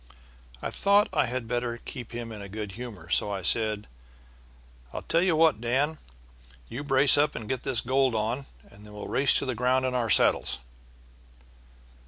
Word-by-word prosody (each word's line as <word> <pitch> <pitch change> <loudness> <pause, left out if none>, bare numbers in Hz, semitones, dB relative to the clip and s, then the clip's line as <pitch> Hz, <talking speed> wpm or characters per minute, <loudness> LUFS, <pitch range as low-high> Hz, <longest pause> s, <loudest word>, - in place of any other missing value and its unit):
"I - - -3
thought 200 +1 +3
I 150 - +2
had 125 -1 -4
better 120 0 -2
keep 120 0 -8
him 120 -1 -6
in 105 -2 -8
a 100 - -8
good 105 0 -6
humor, 105 -6 -9
so 105 - +2
I 100 -2 -4
said: 105 +2 +1 1.1
'I'll - - -6
tell 165 - +1
you 180 -2 +2
what, 155 -8 +3
Dan, 140 +6 0 0.7
you 130 +5 -6
brace 135 0 +5
up 150 +1 +2
and 110 - -6
get 130 0 -2
this 130 -4 +1
gold 130 -1 +1
on, 115 +6 -2 0.2
and 100 +1 -17
then 105 0 -13
we'll 105 -1 -7
race 140 +1 +4
to - - 0
the 130 - -1
ground 125 +2 +1
in 130 - -1
our 120 -3 -1
saddles.' - - +3
120 Hz, 185 wpm, -27 LUFS, 110-135 Hz, 1.1 s, brace